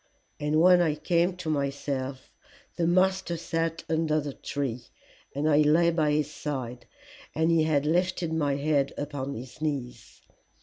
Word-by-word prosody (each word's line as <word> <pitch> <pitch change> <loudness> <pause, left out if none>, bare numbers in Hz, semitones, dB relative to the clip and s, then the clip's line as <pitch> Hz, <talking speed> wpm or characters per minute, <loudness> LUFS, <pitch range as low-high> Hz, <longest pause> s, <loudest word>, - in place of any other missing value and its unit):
And 150 +1 +1
when 180 +1 +6
I 160 -3 +2
came 175 +3 +1
to 180 -2 -7
myself 140 -2 -3 0.4
the 170 - 0
master 185 0 +2
sat 165 0 -2
under 160 -1 +1
the 145 -2 -5
tree, 125 -6 -4 0.5
and 145 +2 0
I 150 -2 +4
lay 160 +3 +4
by 160 -3 +1
his 150 0 0
side, 125 -6 -5 0.5
and 160 +2 +2
he 160 -1 +3
had 150 -2 +1
lifted 175 +1 0
my 145 -3 +1
head 140 -1 +1
upon 140 -1 -4
his 125 +5 -10
knees. 125 -7 -4
150 Hz, 150 wpm, -27 LUFS, 140-165 Hz, 0.5 s, when